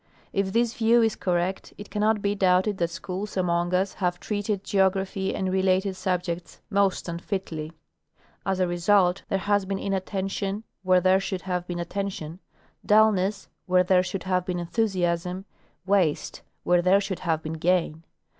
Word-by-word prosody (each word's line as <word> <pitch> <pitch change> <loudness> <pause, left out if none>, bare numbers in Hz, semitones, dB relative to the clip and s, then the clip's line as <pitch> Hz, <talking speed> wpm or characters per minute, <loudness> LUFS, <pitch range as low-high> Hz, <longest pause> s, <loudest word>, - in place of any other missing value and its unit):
If 195 -1 0
this 235 +2 +1
view 230 +1 +4
is 225 -2 +1
correct, 180 +1 -2
it 205 - -10
cannot 210 0 +1
be 200 0 +1
doubted 190 +1 +2
that 170 -1 +1
schools 185 +4 -5
among 175 -1 +1
us 190 +1 +1
have 180 -2 -1
treated 205 -1 -2
geography 190 0 0
and 190 -1 -1
related 190 0 +2
sub 180 -1 -1
jects 170 -1 -5
most 195 -2 +1
unfitly. 170 -2 -4 0.7
As 190 -1 -1
a 185 - +3
result, 180 +1 +2
there 195 - +1
has 205 0 +1
been 195 0 -2
inattention 195 +1 -2 0.2
where 185 -1 +4
there 185 +1 +4
should 195 -1 -4
have 180 -2 -3
been 175 - -4
attention, 175 -2 -4 0.4
dullness 205 -2 +3 0.2
where 180 0 +4
there 185 0 +4
should 185 +1 -4
have 185 -1 0
been 180 0 -3
enthusiasm, 180 -1 -1 0.4
waste 190 -6 +1 0.2
where 175 0 +3
there 185 +3 +4
should 195 -2 -4
have 160 -3 -1
been 155 - -4
gain. 165 -1 0
190 Hz, 160 wpm, -26 LUFS, 180-200 Hz, 0.7 s, view